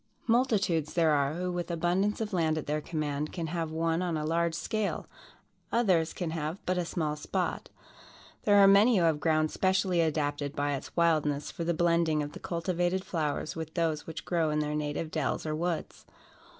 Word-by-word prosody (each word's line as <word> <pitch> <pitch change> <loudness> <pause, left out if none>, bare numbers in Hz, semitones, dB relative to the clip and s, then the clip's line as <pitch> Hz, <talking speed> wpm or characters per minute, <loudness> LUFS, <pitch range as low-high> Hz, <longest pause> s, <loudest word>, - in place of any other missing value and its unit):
Multitudes 210 - +1
there 165 -2 +4
are, 140 0 +1
who, 180 +1 -2
with 175 0 -3
abundance 175 +5 0
of 215 -2 -3
land 160 -3 +1
at 155 - -3
their 150 +1 -1
command, 150 -1 -3
can 170 -3 -4
have 165 0 -2
one 165 +1 0
on 175 -3 -1
a 150 - -2
large 165 +1 +1
scale, 215 +4 -2 0.7
others 185 -9 +2
can 175 -3 -4
have, 160 +1 -3
but 185 - +1
a 175 - -1
small 155 -3 -2
spot. 150 - -3 0.8
There 205 -1 +5
are 200 -1 +8
many 205 +4 +6
who 175 - +3
have 160 -3 +2
ground 155 -1 +2
specially 190 -2 +2
adapted 145 -2 -1
by 145 0 0
its 135 - -6
wildness 155 -4 +2
for 170 - -5
the 170 0 0
blending 170 -2 +2
of 145 - -6
the - - -9
cultivated 175 +2 -1
flowers 155 -2 -2
with 160 -1 -6
those 160 -3 -1
which 160 -1 -7
grow 165 -3 +1
in 150 - 0
their 150 0 -1
native 150 +1 -3
dells 155 -1 -1
or 155 - -1
woods. 170 0 -3
165 Hz, 190 wpm, -29 LUFS, 155-180 Hz, 0.8 s, are